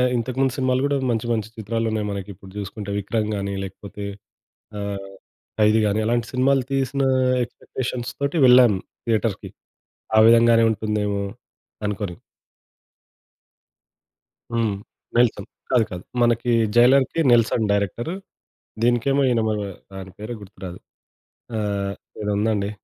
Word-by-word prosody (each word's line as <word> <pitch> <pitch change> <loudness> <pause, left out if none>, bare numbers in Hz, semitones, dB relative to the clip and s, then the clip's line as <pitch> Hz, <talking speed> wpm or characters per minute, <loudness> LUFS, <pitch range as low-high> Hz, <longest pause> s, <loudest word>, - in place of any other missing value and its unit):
ఇంతకు 120 +1 -2
ముందు 135 -2 +2
సినిమాలు 130 -1 +1
కూడా 145 0 +1
మంచి 115 0 -1
మంచి 110 -3 -1
చిత్రాలున్నాయి. 110 0 -1
మనకి 100 0 -5
ఇప్పుడు 95 0 -14
చూసుకుంటే 100 0 -5
'విక్రమ్' 105 +2 -1
గాని, 100 0 -3
లేకపోతే 100 +1 -8 0.8
ఆహ్ 100 -1 -5 0.5
'ఖైదీ' 105 +1 +4
గాని 105 +1 +1
అలాంటి 120 +1 0
సినిమాలు 130 +1 +3
తీసిన 135 0 0 0.4
ఎక్స్‌పెక్టేషన్స్ 120 +1 -5
తోటి 140 +4 0
వెళ్ళాను. 125 -6 +6 0.3
థియేటర్‌కి 110 -3 0 0.7
ఆ - - +8
విధం 115 0 +6
గానే 115 0 +5
ఉంటుందేమో 105 -1 -1 0.6
అనుకోని. 100 -4 -4 2.4
హ్మ్. 115 -3 +1 0.4
'నెల్సన్' 120 -4 +2 0.2
కాదు 120 -4 +4
కాదు. 90 0 -6 0.2
మనకి 120 +1 +2 0.2
జైలర్‌కి 130 +6 +5
'నెల్సన్' 115 -1 +3
డైరెక్టరు. 100 - -1 0.7
దీనికేమో 120 +4 +2
ఈయన 120 -2 +2
ఆయన - - 0 0.6
మన 95 0 -8
పేరు 110 +3 -5
గుర్తురాదు. 95 -3 -9 0.8
ఆహ్, 100 -2 -1 0.3
ఏదో 105 - -2
ఉందండి 105 -1 0
110 Hz, 120 wpm, -23 LUFS, 100-120 Hz, 2.4 s, ఆ